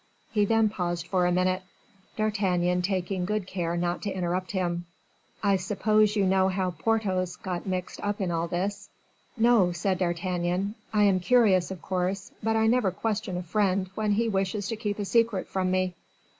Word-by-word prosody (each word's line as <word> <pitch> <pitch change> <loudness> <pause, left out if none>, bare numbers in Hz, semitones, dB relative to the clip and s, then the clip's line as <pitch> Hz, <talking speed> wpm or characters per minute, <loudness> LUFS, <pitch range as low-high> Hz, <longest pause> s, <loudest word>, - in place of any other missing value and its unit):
He 210 -2 +2
then 225 +1 +3
paused 175 -4 -3
for 180 -1 +1
a - - +2
minute, 185 +1 +1 0.5
D'Artagnan 185 -5 +1
taking 185 0 -1
good 210 +1 -1
care 175 -2 -2
not 175 0 -1
to 205 - -2
interrupt 180 0 -2
him. 175 -3 -2 0.6
"I 200 -1 +4
suppose 210 +3 +2
you 200 -2 +2
know 190 0 +3
how 185 -1 0
Porthos 185 0 0
got 180 0 -5
mixed 185 -1 -3
up 205 0 -2
in 185 -3 -1
all 165 0 -1
this?" 195 +4 -3 0.5
"No," 225 -6 +4
said 180 +2 -1
D'Artagnan; 180 +2 -1 0.2
"I 210 -1 +3
am 195 -2 +4
curious, 190 -3 +4
of 190 -3 -7
course, 185 +1 -2
but 225 +1 +1
I 220 0 +3
never 225 -3 +3
question 210 0 -2
a 180 - -4
friend 190 +1 0
when 210 0 0
he 230 +3 +1
wishes 195 0 -1
to 225 - -1
keep 210 -2 -3
a 205 - -2
secret 230 -2 +1
from 185 -1 -1
me." 185 0 +1
190 Hz, 180 wpm, -27 LUFS, 180-210 Hz, 0.6 s, I